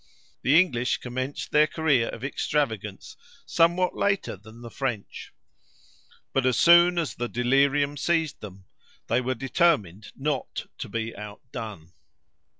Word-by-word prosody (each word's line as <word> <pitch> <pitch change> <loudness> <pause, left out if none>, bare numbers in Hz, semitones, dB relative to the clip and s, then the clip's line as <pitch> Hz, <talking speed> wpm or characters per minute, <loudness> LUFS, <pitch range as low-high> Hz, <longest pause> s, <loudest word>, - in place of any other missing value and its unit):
The 145 +5 +5
English 125 -9 +1
commenced 130 +3 -5
their 150 0 +5
career 145 -7 +1
of 115 - -8
extravagance 110 -8 -2 0.3
somewhat 175 +2 +2
later 200 - 0
than 110 +4 -15
the 120 - -9
French; 120 -7 -4 1.0
but 135 - +2
as 130 -1 +2
soon 175 +1 +6
as 155 -9 -1
the 120 0 -4
delirium 140 +4 +2
seized 160 0 0
them, 95 -2 -10 0.4
they 120 +3 +1
were 130 +1 -2
determined 115 - 0
not 140 -1 -3
to - - -5
be 115 +1 -4
outdone. 105 -4 -8
130 Hz, 130 wpm, -26 LUFS, 115-150 Hz, 1.0 s, soon